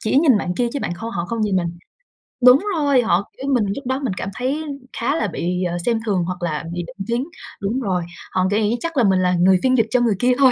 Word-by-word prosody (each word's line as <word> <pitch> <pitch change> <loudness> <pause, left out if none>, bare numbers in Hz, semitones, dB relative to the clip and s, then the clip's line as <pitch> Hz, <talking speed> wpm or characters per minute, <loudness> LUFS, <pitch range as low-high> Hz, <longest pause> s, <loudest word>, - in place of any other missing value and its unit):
chỉ 220 - 0
nhìn 275 -7 +5
bạn 180 -2 -2
kia 240 +3 0
chứ 285 - -2
bạn 175 - -2
kho 225 +6 -6
họ 175 -4 -3
không 230 +2 -3
nhìn 200 -3 +1
mình. 170 -2 0 0.8
Đúng 255 +9 +7
rồi, 285 -5 +3
họ 200 -4 +1
kiểu, 275 +1 -3
mình 235 -5 +2
lúc 275 - -7
đó 260 +1 0
mình 240 -8 -1
cảm 195 - -3
thấy 270 +5 -2 0.3
khá 265 +5 0
là 225 - 0
bị, 180 0 -2
ờ, 175 -1 -1
xem 230 -2 +2
thường 190 -5 +1
hoặc 180 0 -4
là 155 -2 -2
bị 175 - -3
định 195 -2 -8
kiến, 235 +3 0 0.4
đúng 220 +7 -1
rồi, 185 -5 -1 0.3
họ 185 0 +1
nghĩ 215 +2 +1
chắc 330 -3 -4
là 250 - +4
mình 190 -3 +3
là 180 0 +2
người 185 +1 +4
phiên 260 0 +3
dịch 225 -2 +3
cho 250 - +3
người 230 -4 +2
kia 250 +1 +3
thôi. 265 -2 +6
220 Hz, 270 wpm, -21 LUFS, 185-255 Hz, 0.8 s, Đúng